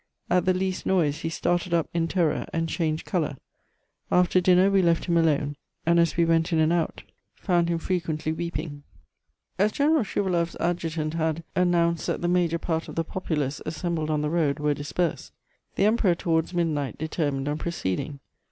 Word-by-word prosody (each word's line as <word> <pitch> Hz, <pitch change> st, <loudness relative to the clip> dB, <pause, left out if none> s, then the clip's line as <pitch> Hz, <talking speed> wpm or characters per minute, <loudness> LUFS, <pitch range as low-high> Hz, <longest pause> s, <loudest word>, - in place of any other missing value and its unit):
At 180 Hz, 0 st, +3 dB
the 185 Hz, -, +4 dB
least 185 Hz, 0 st, -2 dB
noise 155 Hz, -6 st, +2 dB
he 165 Hz, -, -3 dB
started 175 Hz, +1 st, 0 dB
up 165 Hz, -, +1 dB
in 165 Hz, -1 st, +1 dB
terror, 165 Hz, -4 st, 0 dB
and 165 Hz, 0 st, -1 dB
changed 160 Hz, -1 st, -1 dB
colour. 155 Hz, -7 st, -1 dB, 0.7 s
After 180 Hz, 0 st, +4 dB
dinner 185 Hz, +2 st, +5 dB
we 195 Hz, -1 st, +4 dB
left 170 Hz, -2 st, +2 dB
him 175 Hz, -, +1 dB
alone, 145 Hz, -3 st, +2 dB, 0.3 s
and 170 Hz, +1 st, +4 dB
as 170 Hz, 0 st, +2 dB
we 170 Hz, -, +4 dB
went 165 Hz, 0 st, +2 dB
in 165 Hz, -, +2 dB
and 160 Hz, +1 st, +3 dB
out 170 Hz, -1 st, -1 dB, 0.3 s
found 175 Hz, -3 st, +1 dB
him 170 Hz, -, +1 dB
frequently 165 Hz, -3 st, -2 dB
weeping.... 160 Hz, -3 st, -4 dB, 0.8 s
"As... 205 Hz, +2 st, +3 dB
General 295 Hz, +1 st, +2 dB
Schouwaloff's 180 Hz, -4 st, -1 dB
Adjutant 165 Hz, -3 st, -1 dB
had... 160 Hz, 0 st, -1 dB
announced 170 Hz, -2 st, +2 dB
that -, -, -1 dB
the -, -, +2 dB
major 175 Hz, -2 st, +2 dB
part 165 Hz, -1 st, -2 dB
of -, -, -8 dB
the 165 Hz, -, 0 dB
populace 150 Hz, -5 st, -3 dB
assembled 160 Hz, 0 st, -3 dB
on 150 Hz, -1 st, +1 dB
the 150 Hz, -, -1 dB
road 155 Hz, -4 st, +1 dB
were 150 Hz, -1 st, +1 dB
dispersed, 150 Hz, +4 st, -3 dB, 0.4 s
the 195 Hz, -, +2 dB
Emperor 210 Hz, -5 st, +3 dB
towards 165 Hz, -1 st, 0 dB
midnight 160 Hz, -6 st, -1 dB
determined 145 Hz, -3 st, -2 dB
on 150 Hz, +1 st, -1 dB
proceeding. 145 Hz, -, -3 dB
165 Hz, 180 wpm, -26 LUFS, 155-175 Hz, 0.8 s, dinner